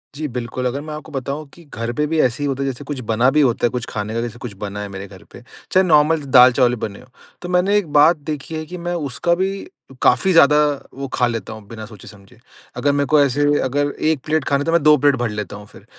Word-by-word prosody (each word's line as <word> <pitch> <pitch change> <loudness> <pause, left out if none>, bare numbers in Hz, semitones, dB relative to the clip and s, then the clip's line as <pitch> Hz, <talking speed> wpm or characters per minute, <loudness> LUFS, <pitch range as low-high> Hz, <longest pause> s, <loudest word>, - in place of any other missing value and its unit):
जी 155 +1 -4
बिल्कुल, 125 0 -5
अगर 135 +3 -3
मैं 155 +1 -7
आपको 155 +1 -9
बताऊँ 140 +2 -4
कि 170 - -16
घर 115 +2 -3
पे 150 - +1
भी 160 - +1
ऐसे 125 +2 0
ही - - 0
होता 135 0 -2
है - - -2
जैसे 135 +2 -7
कुछ 145 -1 -6
बना 120 +4 +3
भी 150 - +3
होता 120 -4 +2
है - - +3
कुछ 125 -2 -4
खाने 105 0 -4
का 115 - -1
जैसे 120 0 -6
कुछ 120 -5 -8
बना 100 0 -6
है 105 - -5
मेरे 95 0 -8
घर 95 -1 -15
पे, 120 - -13 0.3
चाहे 185 - +4
नॉर्मल 155 0 +3
दाल-चावल 125 -1 +6
ही - - -1
बने 100 -1 -8
हो। 125 - -18 0.3
तो 180 - -6
मैंने 180 +3 +2
एक 205 -5 -1
बात 155 +4 +6 0.2
देखी 150 +3 -7
है 155 0 -4
कि 180 +3 -8
मैं 175 0 -4 0.2
उसका 165 +7 0
भी 190 +2 -2 0.4
काफ़ी 130 +10 +3
ज़्यादा 150 -3 +6 0.4
वो 135 0 -4
खा 125 - +2
लेता 115 -4 -5
हूँ 110 -1 -12
बिना 110 0 -8
सोचे 105 -3 -14
समझे। 105 +3 -16 0.4
अगर 145 - +1
मेरे 140 0 0
को 150 - +7
ऐसे 140 0 +1 0.2
अगर 145 +2 0 0.4
1 155 0 0
खाना 140 - 0
है - - -3
तो 165 - 0
मैं 170 0 +3
2 150 0 +7
प्लेट 145 0 +3
भर 120 -2 -2
लेता 105 -2 -5
हूँ 105 0 -10
फिर, - - -17
140 Hz, 265 wpm, -19 LUFS, 120-155 Hz, 0.4 s, को